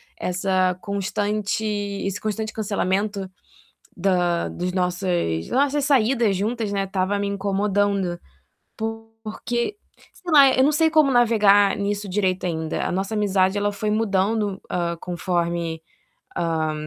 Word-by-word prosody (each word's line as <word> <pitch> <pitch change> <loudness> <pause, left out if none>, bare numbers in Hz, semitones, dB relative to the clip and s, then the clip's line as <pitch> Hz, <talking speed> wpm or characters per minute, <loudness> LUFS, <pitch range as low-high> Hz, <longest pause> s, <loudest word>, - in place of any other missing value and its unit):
essa 185 0 0
constante 205 +2 -2 0.4
esse 195 0 -3
constante 215 0 -3
cancelamento, 200 -1 -1 0.7
da 175 -2 +1
dos 180 +1 -4
nossas 180 - -1
das - - -14
nossas 285 +2 +2
saídas 240 -5 +3
juntas, 215 +2 -2
né, 195 -1 0
estava 195 +1 -1
me 200 - -1
incomodando, 200 -2 0 0.6
porque, 225 - -4 0.4
sei 355 - -7
lá, 280 -3 +8
eu 260 - +4
não 290 - +4
sei 320 +1 +3
como 310 -3 +4
navegar 210 -5 +4
nisso 205 0 -2
direito 185 -1 0
ainda. 160 -2 -2
A - - -1
nossa 190 +4 -2
amizade 195 -2 +2
ela 205 0 0
foi 210 +1 -3
mudando, 205 -1 0
hã, 170 -1 -1
conforme 170 -2 -2 0.5
a 160 -2 0
200 Hz, 130 wpm, -23 LUFS, 185-220 Hz, 0.7 s, lá